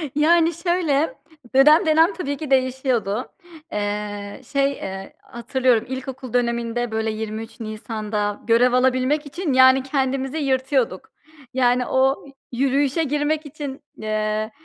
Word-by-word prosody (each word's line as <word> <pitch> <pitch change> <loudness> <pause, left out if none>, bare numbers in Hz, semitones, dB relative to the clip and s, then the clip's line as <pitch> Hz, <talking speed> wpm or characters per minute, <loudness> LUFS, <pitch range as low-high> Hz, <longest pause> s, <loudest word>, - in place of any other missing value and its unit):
Yani 330 +2 +4
şöyle, 330 -3 0 0.4
dönem 300 +7 +6
dönem 320 +4 +4
tabii 285 -6 -4
ki 295 -1 -7
değişiyordu. 255 -4 0 0.4
Eee, 205 +1 -4
şey, 275 0 +2
eee, 195 -6 -7
hatırlıyorum 240 -1 0
ilkokul 260 -1 -6
döneminde 235 -1 -1
böyle 220 0 -1
23 220 +1 -6
Nisan'da 215 -2 -4
görev 240 +2 +4
alabilmek 255 +4 +2
için, 300 +1 -3
yani, 260 0 +6
kendimizi 270 +1 -1
yırtıyorduk. 260 - 0 0.4
Yani, 250 -1 +2
o 265 +2 +1 0.3
yürüyüşe 275 +4 +1
girmek 295 +1 -1
için, 285 -2 -7 0.2
eee, 215 0 -2
260 Hz, 115 wpm, -22 LUFS, 225-285 Hz, 0.4 s, dönem